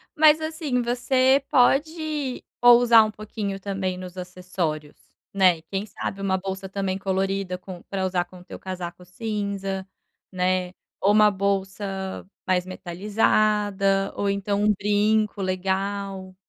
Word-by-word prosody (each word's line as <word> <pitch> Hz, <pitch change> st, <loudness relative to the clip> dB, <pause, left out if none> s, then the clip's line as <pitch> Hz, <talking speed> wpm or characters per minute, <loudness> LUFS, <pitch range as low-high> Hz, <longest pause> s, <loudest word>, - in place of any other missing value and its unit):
Mas 310 Hz, 0 st, +6 dB
assim, 315 Hz, -5 st, -1 dB
você 255 Hz, +3 st, +2 dB
pode 295 Hz, +1 st, +1 dB, 0.2 s
ousar 240 Hz, -2 st, +8 dB
um 215 Hz, -, -4 dB
pouquinho 205 Hz, -2 st, -5 dB
também 190 Hz, -2 st, -3 dB
nos 185 Hz, 0 st, -9 dB
acessórios, 180 Hz, -4 st, -4 dB, 0.4 s
né? 185 Hz, -3 st, +5 dB
E -, -, -19 dB
quem 195 Hz, +3 st, -4 dB
sabe 195 Hz, -1 st, -5 dB
uma 190 Hz, -1 st, +1 dB
bolsa 190 Hz, 0 st, -5 dB
também 195 Hz, -1 st, -2 dB
colorida 190 Hz, -1 st, -1 dB
com 180 Hz, -1 st, -10 dB
pra 190 Hz, -1 st, -3 dB
usar 180 Hz, -1 st, 0 dB
com 185 Hz, -, -14 dB
o 180 Hz, -, -14 dB
teu -, -, -9 dB
casaco 180 Hz, -1 st, -6 dB
cinza, 200 Hz, -1 st, -4 dB, 0.4 s
né? 185 Hz, 0 st, +1 dB, 0.3 s
Ou 200 Hz, -, +3 dB
uma 210 Hz, 0 st, +6 dB
bolsa 195 Hz, 0 st, -2 dB, 0.2 s
mais 180 Hz, -1 st, +1 dB
metalizada, 195 Hz, +1 st, +1 dB
ou 200 Hz, -, 0 dB
então 200 Hz, +1 st, -1 dB
um 210 Hz, 0 st, +4 dB
brinco 210 Hz, +1 st, +1 dB
legal. 190 Hz, 0 st, -2 dB
195 Hz, 135 wpm, -24 LUFS, 185-215 Hz, 0.4 s, ousar